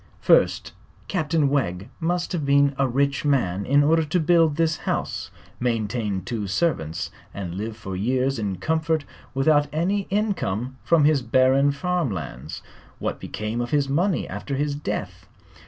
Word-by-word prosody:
First, - - +3 0.4
Captain 160 -4 +1
Wegg 100 -9 -1
must 175 +1 -1
have 170 -4 -1
been 140 0 +4
a 135 - +3
rich 140 +2 0
man 100 -10 +1
in 145 +2 +5
order 160 +2 +4
to 155 +4 0
build 165 -2 +4
this 165 0 +1
house, - - -3 0.3
maintain 110 -5 -1
two 110 -2 -3
servants 95 - -1 0.2
and 95 -4 -5
live 110 +4 -5
for 95 -4 -6
years 130 +6 0
in 100 -3 -2
comfort 160 - 0 0.3
without 145 +2 +3
any 190 +6 0
income 135 - -1
from 165 -3 +4
his 150 -2 +4
barren 130 +3 +3
farm 175 +1 -1
lands. 70 - -6 0.3
What - - -3
became 110 +3 -4
of 120 - -3
his 145 0 +1
money 175 +6 +1
after 105 +8 -4
his 145 +1 0
death? 145 +1 -5
140 Hz, 155 wpm, -24 LUFS, 110-155 Hz, 0.4 s, in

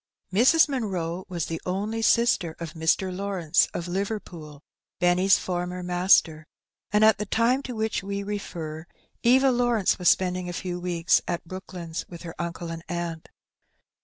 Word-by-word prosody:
Mrs. 260 - +5
Munroe 190 - -3
was 170 -3 -2
the 165 -1 -5
only 205 +5 -2
sister 225 -8 +2
of 165 -2 -6
Mr. 170 +3 0
Lawrence, 185 -4 +1
of 170 - -5
Liverpool, 175 -6 -5 0.4
Benny^s 180 +2 +4
former 180 0 -3
master, 175 -3 +3 0.4
and, 210 +1 +4
at 220 -2 +5
tlie 210 -2 -4
time 240 +4 +2
to 250 -3 -6
which 220 0 -1
we 200 +1 -4
refer, 170 -6 -6 0.3
Eva 260 +3 +5
Lawrence 240 -6 +1
was 180 - +4
spending 180 -1 +1
a - - -5
few 180 0 -4
weeks 175 -1 +2
at 170 - -3
Brook 185 +3 -9
lands 170 -2 -5
with 170 -1 -10
her 165 -2 -7
uncle 170 0 -5
and 165 0 -7
aunt. 170 -2 -4
180 Hz, 160 wpm, -26 LUFS, 170-210 Hz, 0.4 s, Mrs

